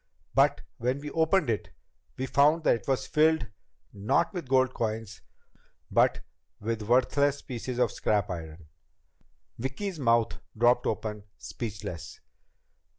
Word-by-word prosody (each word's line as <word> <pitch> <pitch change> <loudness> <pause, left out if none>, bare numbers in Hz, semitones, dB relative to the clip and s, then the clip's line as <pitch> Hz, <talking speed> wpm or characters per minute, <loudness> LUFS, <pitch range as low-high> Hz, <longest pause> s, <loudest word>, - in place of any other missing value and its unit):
But - - +3 0.2
when 125 +3 0
we 150 0 -7
opened 165 +2 +2
it, 110 -3 -1 0.5
we 130 - -2
found 145 +5 +3
that - - +5
it 115 - -9
was 135 -1 0
filled 155 -2 +3 0.5
not 100 - +1
with 175 -5 -4
the - - -19
gold 130 -1 +3
coins 110 -2 -3 0.7
but - - +3 0.4
with 115 +1 -2
worthless 130 +5 +2
pieces 125 0 -5
of 125 -3 +2
scrap 105 -3 0
iron." 80 -2 -7 0.9
Vicki's 160 - -4
mouth 115 -3 +2 0.2
dropped 120 +2 +4
open, 105 -1 -3
speechless. 95 -7 -6
125 Hz, 130 wpm, -28 LUFS, 110-140 Hz, 0.9 s, that